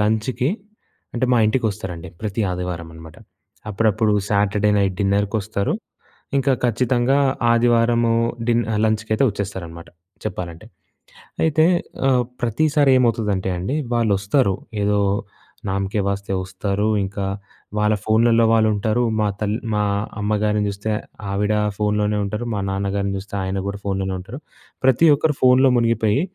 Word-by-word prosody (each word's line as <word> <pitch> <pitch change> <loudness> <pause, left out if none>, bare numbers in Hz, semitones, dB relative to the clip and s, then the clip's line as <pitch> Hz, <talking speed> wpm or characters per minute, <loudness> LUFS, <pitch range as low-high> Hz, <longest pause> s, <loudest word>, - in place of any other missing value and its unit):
లంచ్‌కి 110 +5 0 0.6
అంటే 125 +1 0
మా 120 - +4
ఇంటికి 115 +3 0
వస్తారండి. 90 -3 -7
ప్రతి 110 0 -3
ఆదివారం 90 -2 -4
అనమాట. 80 -1 -12 0.5
అప్పుడప్పుడు 110 +1 +1 0.2
సాటర్డే 105 0 +2
నైట్ 95 -2 0
డిన్నర్‌కొస్తారు. 100 +1 0 0.7
ఇంకా 135 0 +2
ఖచ్చితంగా 125 +3 +2 0.3
ఆదివారము 115 0 +3 0.3
డి 120 - +3 0.3
లంచ్‌కి 110 0 -1
అయితే 125 - +2
వచ్చేస్తారనమాట 95 -5 -6 0.4
చెప్పాలంటే. 90 -2 -5 0.8
అయితే 155 0 +3 0.4
ఆహ్, 125 -2 +3 0.2
ప్రతిసారి 140 +4 +2
ఏమవుతదంటే 110 -6 +1
అండి 95 +11 -2 0.2
వాళ్ళొస్తారు 105 0 +2 0.3
ఏదో 105 0 +2 0.7
నామ్‌కే 100 +2 -1
వాస్తే 100 0 -4
వస్తారు. 100 +3 -2 0.2
ఇంకా 100 0 -4 0.5
వాళ్ళ 105 0 +3
ఫోన్లలో 115 +1 +4
వాళ్ళుంటారు. 110 +1 +2 0.2
మా 105 - +2
తల్ 105 -1 -1 0.2
మా 105 0 +1 0.4
అమ్మగారిని 105 0 +1
చూస్తే, 100 +2 -4 0.4
ఆవిడ 105 +2 0 0.2
ఫోనులోనే 105 0 0
ఉంటారు. 105 +4 -4
మా 105 - -2
నాన్నగారిని 100 0 -1
చూస్తే, 100 +1 -8
ఆయన 95 +1 -2
కూడా 100 0 -3
ఫోనులోనే 95 -1 -1
ఉంటారు. 105 +9 -9 0.4
ప్రతి 130 +5 +4
ఒక్కరు 150 +1 0
ఫోనులో 130 +1 +5
మునిగిపోయి 115 0 +2
105 Hz, 120 wpm, -21 LUFS, 100-115 Hz, 0.8 s, ఫోనులో